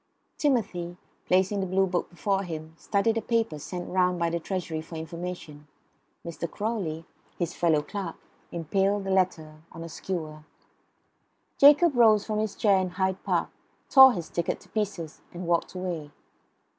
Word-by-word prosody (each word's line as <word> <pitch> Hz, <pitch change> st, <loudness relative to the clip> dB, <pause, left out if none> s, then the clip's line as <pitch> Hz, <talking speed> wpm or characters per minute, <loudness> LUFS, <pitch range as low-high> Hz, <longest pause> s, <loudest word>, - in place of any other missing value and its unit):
Timothy, 190 Hz, -, 0 dB, 0.3 s
placing 190 Hz, +2 st, +2 dB
the 190 Hz, -, -1 dB
Blue 190 Hz, +1 st, +2 dB
book 180 Hz, -1 st, -2 dB
before 195 Hz, +2 st, -1 dB
him, 160 Hz, -3 st, -6 dB
studied 215 Hz, +6 st, 0 dB
a -, -, 0 dB
paper 225 Hz, -10 st, 0 dB
sent 175 Hz, +4 st, -6 dB
round 180 Hz, -1 st, +2 dB
by 170 Hz, -1 st, 0 dB
the 170 Hz, -, -1 dB
Treasury 170 Hz, -3 st, -3 dB
for 160 Hz, +1 st, -10 dB
information. 160 Hz, -2 st, -7 dB, 0.6 s
Mr. 170 Hz, 0 st, -5 dB
Crawley, 190 Hz, -8 st, -3 dB, 0.3 s
his 175 Hz, -2 st, -2 dB
fellow 160 Hz, -3 st, +2 dB
clerk, 195 Hz, -3 st, -5 dB, 0.4 s
impaled 195 Hz, +4 st, 0 dB
a 195 Hz, -, -2 dB
letter 160 Hz, -5 st, 0 dB
on 165 Hz, -, -8 dB
a 165 Hz, -, -7 dB
skewer. 160 Hz, -3 st, -5 dB, 1.2 s
Jacob 295 Hz, +2 st, +7 dB
rose 220 Hz, -3 st, +5 dB
from 215 Hz, -1 st, -1 dB
his 215 Hz, -2 st, -2 dB
chair 200 Hz, -3 st, +3 dB
in 185 Hz, -1 st, -1 dB
Hyde 190 Hz, +1 st, -1 dB
Park, -, -, 0 dB, 0.4 s
tore 265 Hz, -2 st, +10 dB
his 175 Hz, -6 st, -5 dB
ticket 170 Hz, -1 st, -2 dB
to -, -, -19 dB
pieces, 195 Hz, -7 st, -3 dB
and 175 Hz, +1 st, -6 dB
walked 170 Hz, +1 st, 0 dB
away. 175 Hz, -5 st, -4 dB
180 Hz, 155 wpm, -27 LUFS, 165-200 Hz, 1.2 s, tore